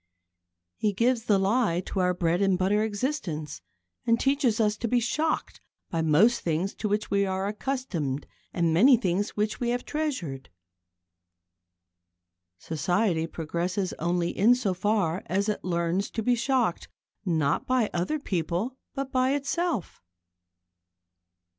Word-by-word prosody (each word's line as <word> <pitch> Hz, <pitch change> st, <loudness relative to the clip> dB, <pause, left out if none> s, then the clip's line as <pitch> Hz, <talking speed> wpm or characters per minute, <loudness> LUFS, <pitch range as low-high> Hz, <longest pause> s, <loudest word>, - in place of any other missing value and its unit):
He 210 Hz, -1 st, 0 dB
gives 235 Hz, +2 st, +1 dB
the 205 Hz, -4 st, +4 dB
lie 195 Hz, -2 st, +2 dB
to 190 Hz, -, -4 dB
our 180 Hz, -1 st, +2 dB
bread 175 Hz, +1 st, +1 dB
and 195 Hz, -2 st, +3 dB
butter 200 Hz, +3 st, +2 dB
existence, 200 Hz, -, -3 dB, 0.4 s
and 230 Hz, 0 st, +2 dB
teaches 270 Hz, -5 st, +2 dB
us 210 Hz, -1 st, +2 dB
to 235 Hz, -, -2 dB
be 245 Hz, +2 st, +3 dB
shocked 305 Hz, +7 st, -1 dB, 0.3 s
by 165 Hz, -, 0 dB
most 180 Hz, +10 st, +4 dB
things 170 Hz, +4 st, -1 dB
to 215 Hz, -, -2 dB
which 210 Hz, +1 st, -1 dB
we 200 Hz, 0 st, +3 dB
are 190 Hz, 0 st, -1 dB
accustomed 200 Hz, -, -3 dB, 0.3 s
and 170 Hz, -2 st, +1 dB
many 245 Hz, +10 st, +6 dB
things 200 Hz, 0 st, -1 dB
which 210 Hz, +1 st, -1 dB
we 240 Hz, -, -1 dB
have 245 Hz, +1 st, -1 dB
treasured. 255 Hz, -, -3 dB, 2.1 s
Society 165 Hz, -, 0 dB
progresses 175 Hz, +4 st, -2 dB
only 175 Hz, +1 st, 0 dB
in 230 Hz, +5 st, +5 dB
so 230 Hz, -7 st, -1 dB
far 190 Hz, -2 st, 0 dB
as 195 Hz, +4 st, 0 dB
it 210 Hz, -, -2 dB
learns 170 Hz, +2 st, 0 dB
to 225 Hz, -, -3 dB
be 245 Hz, -, +3 dB
shocked, 240 Hz, -5 st, 0 dB, 0.4 s
not 160 Hz, -7 st, 0 dB
by 255 Hz, -4 st, +2 dB
other 180 Hz, -, 0 dB
people, 190 Hz, -, -2 dB, 0.2 s
but 270 Hz, -1 st, -3 dB
by 260 Hz, +1 st, +2 dB
itself. 285 Hz, -, -2 dB
200 Hz, 140 wpm, -27 LUFS, 175-240 Hz, 2.1 s, many